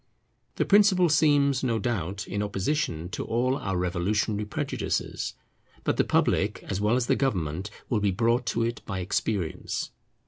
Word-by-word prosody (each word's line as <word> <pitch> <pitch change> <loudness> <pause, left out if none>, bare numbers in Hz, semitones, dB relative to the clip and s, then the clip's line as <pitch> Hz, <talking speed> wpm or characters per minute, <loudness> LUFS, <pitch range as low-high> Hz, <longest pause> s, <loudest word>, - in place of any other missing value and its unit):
The - - +1
principle 195 -4 +5
seems, 145 -3 +3
no 115 -3 +1
doubt, 100 -3 -2
in 100 +1 -2
opposition 100 - -1
to - - -4
all 125 +3 +1
our 95 -8 -2
revolutionary 100 +4 0
prejudices. 105 - -3 0.5
But - - 0
the - - +4
public, - - +1
as 95 +1 -3
well 105 +3 +3
as 125 -1 +1
the - - +2
government, 95 - -1 0.2
will 115 - +1
be 105 -1 +2
brought 115 +5 +1
to 115 - +1
it 115 +1 -2
by 95 - -3
experience. 95 -1 -2
105 Hz, 160 wpm, -27 LUFS, 95-130 Hz, 0.5 s, principle